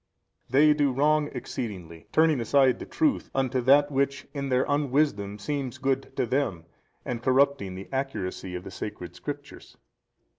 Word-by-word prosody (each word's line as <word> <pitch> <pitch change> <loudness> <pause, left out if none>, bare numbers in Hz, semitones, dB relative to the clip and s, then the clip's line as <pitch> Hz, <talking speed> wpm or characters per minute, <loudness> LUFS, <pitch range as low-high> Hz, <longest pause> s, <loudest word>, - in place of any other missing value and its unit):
A. - - -19
They 150 +3 +6
do 145 -2 +2
wrong 150 +3 +2
exceedingly, 95 -10 -6
turning 160 -5 +3
aside 130 +1 +3
the - - -7
truth 305 -4 0
unto 130 -1 +1
that 145 +3 +5
which 140 0 0
in 140 -2 -3
their 130 0 +2
unwisdom 140 -8 +1
seems 135 +3 -3
good 135 0 -1
to - - +1
them 115 -10 -1 0.4
and 120 -2 -3
corrupting 130 -6 +2
the 95 +1 -8
accuracy 95 -9 -3
of 90 - -5
the 95 - -9
sacred 90 -4 -7
Scriptures. 145 +4 -8
135 Hz, 155 wpm, -27 LUFS, 105-145 Hz, 0.4 s, They